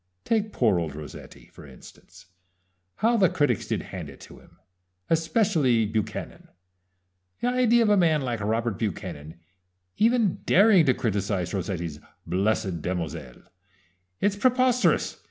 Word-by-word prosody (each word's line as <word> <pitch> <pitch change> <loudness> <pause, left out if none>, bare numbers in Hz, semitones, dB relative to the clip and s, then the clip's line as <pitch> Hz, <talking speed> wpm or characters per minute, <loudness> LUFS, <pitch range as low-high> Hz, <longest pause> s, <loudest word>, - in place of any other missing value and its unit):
Take 215 -2 0
poor 110 -8 +2
old 80 -4 -4
Rossetti, 75 0 -11
for - - -13
instance, 70 -3 -16 0.7
how 235 +2 +2
the 190 -5 +4
critics 125 -8 0
did - - -2
hand - - -6
it - - -13
to - - -13
him, - - -22 0.5
especially 160 - +2
Buchanan 110 0 -4 0.9
the 245 - 0
idea 240 -2 +3
of 215 - +2
a 205 - +4
man 160 -5 +3
like 120 -4 -3
Robert 110 0 -1
Buchanan 85 -7 -5 0.6
even 225 -4 +2
daring 195 -5 +5
to 130 - +4
criticize 100 -4 -2
Rossetti's 85 -5 -4 0.3
'Blessed 95 -3 -1
Damozel'! 80 -8 -5 0.8
It's 205 0 +1
preposterous! 255 +2 +2
120 Hz, 130 wpm, -25 LUFS, -, 0.9 s, daring